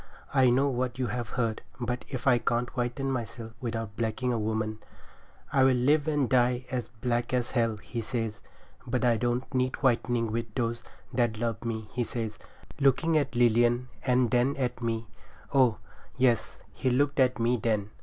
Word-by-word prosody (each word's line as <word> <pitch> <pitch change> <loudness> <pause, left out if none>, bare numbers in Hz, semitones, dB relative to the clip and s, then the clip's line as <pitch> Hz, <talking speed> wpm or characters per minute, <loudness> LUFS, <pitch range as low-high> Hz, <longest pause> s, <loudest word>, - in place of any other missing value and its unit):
I 130 -2 +5
know 130 +3 +3
what 125 -2 -1
you 130 - 0
have 120 -2 -3
heard, 115 -3 0 0.2
but 125 0 -3
if 130 -3 -5
I 125 -3 +5
can't 120 0 -1
whiten 125 +2 -1
myself 115 -2 -4
without 115 -4 -4
blacking 115 +2 -1
a 115 - 0
woman 110 0 -2 0.7
I'll 135 -1 +5
live 140 +4 +3
and 145 -4 +2
die 125 0 +2
as 125 -3 -2
black 120 +1 -1
as 125 -1 -1
hell,' 115 -3 +1
he 115 +3 -5
says. 115 -2 -3 0.5
'But 125 0 0
I 120 -2 +4
don't 120 +3 -1
need 130 0 +1
whitening 120 -3 +2
with 115 -1 -3
those 115 -2 -1 0.3
that 120 -3 +1
love 115 0 -2
me,' 110 -2 -3
he 125 - 0
says, 110 -1 -4 0.4
looking 140 +4 +3
at 140 -3 +1
Lilian 120 +1 +3
and 125 -2 +2
then 125 +3 +3
at 125 -2 -2
me—oh! 115 +1 -1 0.4
yes, 125 -4 +2 0.2
he 130 - 0
looked 140 +3 +1
at 130 -1 +4
me 120 +1 +2
then. 105 -2 -1
120 Hz, 170 wpm, -28 LUFS, 115-130 Hz, 0.7 s, I